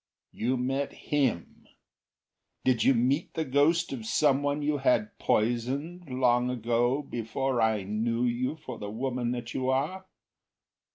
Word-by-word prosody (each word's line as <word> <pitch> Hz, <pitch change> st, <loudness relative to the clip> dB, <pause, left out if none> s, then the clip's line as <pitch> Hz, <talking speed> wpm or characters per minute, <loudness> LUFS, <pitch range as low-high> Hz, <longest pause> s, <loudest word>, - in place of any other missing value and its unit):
"You 125 Hz, +3 st, -1 dB
met 135 Hz, +3 st, -1 dB
him? 130 Hz, -, -2 dB, 1.0 s
Did 125 Hz, -4 st, +2 dB
you 135 Hz, -, +5 dB
meet 130 Hz, +7 st, 0 dB
the 160 Hz, -, -1 dB
ghost 150 Hz, +5 st, +2 dB
of 120 Hz, -4 st, -5 dB
someone 145 Hz, +2 st, +2 dB
you 145 Hz, 0 st, 0 dB
had 125 Hz, -5 st, +1 dB
poisoned, 135 Hz, +10 st, -1 dB
Long 125 Hz, -1 st, +2 dB
ago, 120 Hz, +3 st, +1 dB
before 125 Hz, 0 st, -2 dB
I 110 Hz, -3 st, +2 dB
knew 115 Hz, +4 st, -1 dB
you 125 Hz, +4 st, 0 dB
for 130 Hz, -7 st, -9 dB
the 105 Hz, -, -5 dB
woman 125 Hz, +2 st, -2 dB
that 120 Hz, -1 st, -5 dB
you 130 Hz, 0 st, -1 dB
are? 155 Hz, +9 st, -1 dB
130 Hz, 135 wpm, -28 LUFS, 120-140 Hz, 1.0 s, you